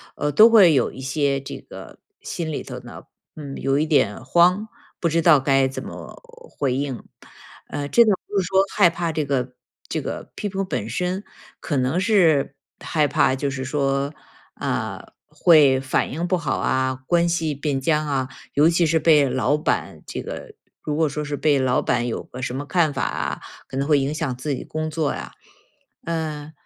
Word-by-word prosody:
呃， 150 - -1
都 215 +11 +8
会 200 -8 +7
有 130 -4 +2
一 - - -11
些 140 +1 0
这 135 - -8
个 - - -12 0.2
心 165 -2 -4
里 150 - -4
头 - - -7
呢， - - -11 0.3
嗯， 145 -3 -7
有 135 0 0
一 150 - +2
点 145 -11 +1
慌， 180 +8 +3 0.3
不 170 - +1
知 165 +1 +1
道 160 -3 +6
该 135 0 +3
怎 130 - -6
么 - - -9 0.3
回 135 -3 -1
应。 135 -2 -3 0.7
呃， 145 -1 -4
这 235 +10 +6
个 215 - +4 0.2
不 205 - 0
是 185 - -1
说 190 +1 +3
害 200 -4 +6
怕 170 0 -2
这 155 -1 -1
个 130 -2 -2 0.3
这 - - -2
个 - - -6
批 205 - -3
评 195 0 -2
本 110 - -3
身， 180 - -2 0.4
可 145 - -2
能 130 +7 +1
是 175 -10 +3 0.2
害 150 -2 +1
怕， 130 - +2
就 140 +1 -2
是 130 -1 -4
说， 140 +1 -1 0.4
啊， - - -4
会 145 -6 +5
反 130 0 -1
应 170 +5 -3
不 185 - +2
好 170 - -2
啊， 130 0 0
关 170 0 +3
系 160 -3 -1
变 140 -1 -2
僵 155 +2 +1
啊， 135 -3 -1 0.3
尤 150 +3 +5
其 170 0 +2
是 160 +1 +2
被 150 -4 +4
老 130 +3 +1
板 150 - -2
这 - - -5
个 480 -3 -8 0.3
如 150 - -2
果 160 -1 +3
说 150 +2 -4
是 145 0 -3
被 145 -2 +2
老 130 -1 +2
板 120 0 0
有 - - -3
个 130 - -10
什 125 - -3
么 140 +2 -4
看 160 -2 +1
法 135 - -2
啊， - - -3 0.3
可 130 - -5
能 140 +1 -1
会 150 -2 +4
影 135 +2 -1
响 155 -5 -2
自 140 +3 -3
己 - - -7
工 155 0 -3
作 155 -2 -1
呀。 - - -7 0.7
呃， 155 -2 -4
150 Hz, 210 characters per minute, -22 LUFS, 135-170 Hz, 0.7 s, 都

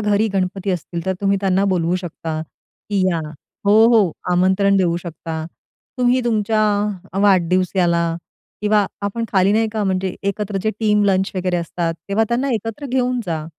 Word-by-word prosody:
घरी 210 +1 +2
गणपती 195 +1 -1
असतील, 170 -1 -4
तर 190 - +2
तुम्ही 200 0 +2
त्यांना 195 0 +2
बोलवू 175 0 +1
शकता, 165 -3 -5
की 200 +5 -6
या 170 -2 0 0.5
हो, 205 - +5 0.2
हो, 195 -8 +4 0.2
आमंत्रण 190 +2 +3
देऊ 175 -3 +2
शकता. 165 -2 -6 0.5
तुम्ही 250 +1 +3
तुमच्या 215 -1 +1 0.6
वाढदिवसाला 180 -2 +2 0.6
किंवा 210 -1 +3 0.2
आपण 230 +3 -2
खाली 195 +1 +4
नाही 220 +1 +2
का, 215 -2 -1
म्हणजे 190 -1 -1
एकत्र 200 0 -2
जे 215 - +1
टीम 210 -1 +3
लंच 190 -1 +2
वगैरे 180 -1 0
असतात, 170 0 -2
तेव्हा 215 +3 +2
त्यांना 255 +4 0
एकत्र 225 +6 -4
घेऊन 250 -1 0
जा. 160 -2 -2
195 Hz, 155 wpm, -20 LUFS, 180-210 Hz, 0.6 s, हो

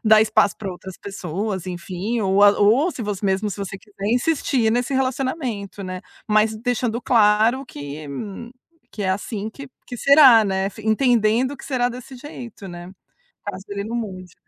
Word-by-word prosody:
dar 215 0 +7
espaço 215 -4 +2
pra 195 -3 -4
outras 185 +1 -10
pessoas, 195 0 -4
enfim. 185 +6 -3
Ou 195 0 +2
a 205 - +9
ou 240 - +4
se 285 - -8
você 205 -1 -4
mesmo 195 +2 +1
se 190 - -5
você 195 0 -5
quiser 200 -1 -8
insistir 250 -4 +1
nesse 245 +3 0
relacionamento, 255 - -2
né. 185 0 -5 0.3
Mas 215 +1 +3
deixando 245 -1 -1
claro 225 +3 +3
que 145 -3 -8 0.8
que 210 - -6
é 190 - 0
assim 205 +2 -3
que 275 +4 -10 0.2
que 245 - -7
será, 270 -4 +7
né. 190 -1 0
Entendendo 235 +3 +2
que - - -12
será 255 -3 0
desse 250 +2 -9
jeito 245 -6 -9
né, 175 0 -9 0.5
caso 195 -2 -6
ele 200 0 -3
não 230 +2 -4
mude. 185 -6 -6
215 Hz, 165 wpm, -22 LUFS, 195-245 Hz, 0.8 s, a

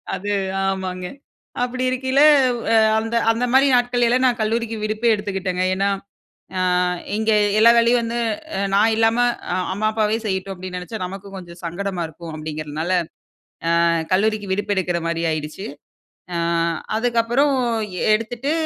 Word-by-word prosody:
அது 205 +2 -4 0.3
ஆமாங்க. 185 -1 -3 0.6
அப்படி 255 +1 -2
இருக்கும்போது 260 +1 0 0.4
வ் 235 - -7
அ, - - +5 0.2
அந்த 225 +1 -3 0.2
அந்த 235 +2 0
மாதிரி 270 +1 +6
நாட்கள்லாம் 245 +1 +2
நான் 245 -1 0
கல்லூரிக்கு 225 +1 -1
விடுப்பே 215 +2 +1
எடுத்துகிட்டேங்க. 190 -3 -2
ஏன்னா, 195 +1 +1 0.7
அ - - 0 0.6
இங்கே 220 0 +2 0.2
எல்லா 225 +2 +7
வேலையும் 235 +1 +4
வந்து 235 +1 -3 0.4
அ - - -1
நான் 220 +3 +4
இல்லாம, 225 +1 +2 0.3
அ - - +1 0.2
"அம்மா, 215 +2 0
அப்பாவே 215 0 +1
செய்யட்டும்!" 190 -1 -2
அப்டீன்னு 180 0 -6
நெனைச்சா, 195 +5 -7
நமக்கும் 195 +1 -9
கொஞ்சம் 175 -1 -12
சங்கடமா 175 +1 -3
இருக்கும் 165 +1 -10
அப்டீங்குறதுனால, 155 +2 -4 0.9
அ - - +4 0.3
கல்லூரிக்கு 205 0 +1
விடுப்பு 205 +1 -1
எடுக்குற 175 -2 0
மாரி 170 0 -2
ஆயிடுச்சு. 155 +5 -5 0.7
அ, - - -1 0.6
அதுக்கப்பறம் 245 +4 +2 0.6
எடுத்துட்டு 235 +6 -2
210 Hz, 140 wpm, -21 LUFS, 185-235 Hz, 0.9 s, எல்லா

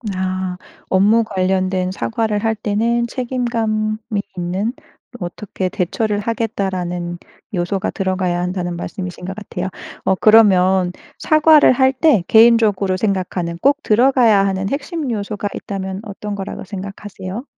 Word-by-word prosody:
아 185 -1 -2 0.3
업무 210 +5 +4
관련된 185 -1 0
사과를 205 - -1
할 220 0 +1
때는 225 +3 0
"책임감이 230 -4 -1 0.4
있는 185 +6 -1 0.5
'어떻게 185 +1 -4
대처를 205 +4 -1
하겠다.'라는 190 -6 -2 0.4
요소가 190 +2 -1
들어가야 185 -3 -1
한다."는 180 -1 -3
말씀이신 180 0 -6
것 190 +1 -5
같아요. 195 -3 -5 0.4
어 190 - +3
그러면 190 -4 +5 0.2
사과를 310 -2 +5
할 260 +1 +4
때 265 - +3
개인적으로 220 -4 +5
생각하는 185 -4 -2
꼭 285 +2 +2
들어가야 230 -3 +4
하는 195 0 -1
핵심 285 +1 -3
요소가 205 -1 -3
있다면 190 -1 -5
어떤 210 -1 -6
거라고 195 -1 -6
생각하세요? 195 +2 -7
200 Hz, 305 characters per minute, -19 LUFS, 185-225 Hz, 0.5 s, 그러면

